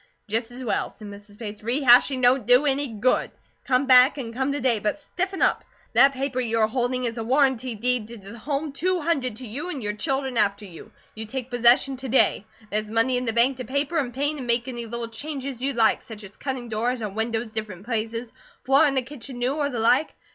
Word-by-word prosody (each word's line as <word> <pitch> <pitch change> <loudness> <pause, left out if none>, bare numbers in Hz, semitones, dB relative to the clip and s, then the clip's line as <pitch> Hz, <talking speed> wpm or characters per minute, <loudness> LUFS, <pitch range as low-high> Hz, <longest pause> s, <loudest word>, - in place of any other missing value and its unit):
"Jest 225 +2 -1
as 250 +2 -8
well," 235 - -1
said 210 -2 -11
Mrs. 205 0 -12
Bates. 210 -2 -7
"Re 240 +6 0
hashing 255 +1 +5
don't 245 -2 +3
do 250 +4 +5
any 285 0 +1
good. 230 +2 0 0.4
Come 255 +1 +2
back, 255 +2 +6
and 230 -4 -6
come 265 +3 -1
to 285 - -2
day; 250 -4 +2
but 210 +5 -1
stiffen 370 +5 -3
up. - - +2 0.3
That 275 0 +6
paper 265 -1 -2
you 230 -2 -1
are 220 - +4
holding 250 +2 -1
is 230 0 -3
a - - -3
warrantee 260 -1 +1
deed 240 0 -1
to 235 +1 -9
the 205 +3 -11
home 290 +4 -3
two 360 +6 0
hundred 275 -8 -1
to 250 +2 -9
you 280 +12 -5
and 280 -9 -5
your 210 0 -2
children 265 +2 -2
after 205 0 +1
you. 170 -4 -12 0.2
You 220 0 -7
take 260 +1 -5
possession 245 +3 +4
to 260 0 -7
day. 225 -4 +2 0.2
There's 215 +1 -1
money 230 +3 +2
in 250 0 -1
the 225 - +1
bank 245 +3 +3
to 255 - -5
paper, 280 +6 -1
an' 255 -4 -2
paint, 290 +4 -2
and 250 - -6
make 235 +1 +1
any 240 -2 -5
little 235 +1 -4
changes 270 +1 -6
you'd 275 +1 -1
like, 225 -2 +3
such 220 -2 -11
as 195 0 -11
cutting 260 -3 -5
doors 230 +2 -1
or 210 - -2
windows 220 +2 -3
different 210 -4 -6
places, 230 0 -3 0.3
floorin' 275 +2 +4
the 260 - +1
kitchen 260 -1 -9
new, 245 +2 0
or 290 -1 -1
the 250 - -5
like. 250 +7 +2
245 Hz, 230 wpm, -24 LUFS, 225-270 Hz, 0.4 s, back